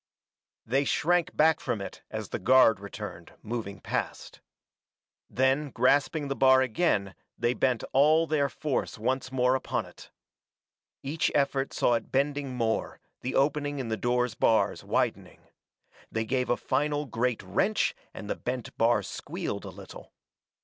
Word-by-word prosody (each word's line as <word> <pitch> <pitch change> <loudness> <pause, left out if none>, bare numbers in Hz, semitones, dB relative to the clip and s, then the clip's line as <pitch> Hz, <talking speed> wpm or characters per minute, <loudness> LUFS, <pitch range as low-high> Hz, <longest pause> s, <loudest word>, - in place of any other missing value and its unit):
They 135 +5 +1
shrank 175 +4 +1
back 160 +1 +4
from 110 - -2
it 100 - -7
as - - -5
the - - -3
guard 115 -1 +5
returned, 100 0 -8
moving 105 -4 -5
past. - - -4 0.9
Then 135 +3 +1
grasping 140 +5 +2
the 140 - -2
bar 130 -1 +5
again 110 - 0 0.2
they 120 +1 +1
bent 125 -3 0
all 155 +4 +5
their 145 -3 +1
force 150 -2 -2
once 130 +4 -1
more 125 -1 +2
upon 130 - -1
it. - - -14 0.9
Each 150 +4 0
effort 140 -1 +1
saw 120 - +2
it 115 -2 -2
bending 140 -1 0
more, 115 -2 -1 0.2
the 130 - -3
opening 145 +1 +1
in 130 -4 -4
the 110 - 0
door's 120 +2 0
bars 115 0 +2
widening. - - -2 0.7
They 110 0 -1
gave 125 +2 -1
a 120 - +2
final 150 0 0
great 120 -2 -1
wrench 105 - +1 0.2
and 105 - -9
the - - -1
bent 125 -1 -5
bar 115 -2 +3
squealed - - -5
a - - -6
little. - - -12
130 Hz, 150 wpm, -28 LUFS, 115-145 Hz, 0.9 s, guard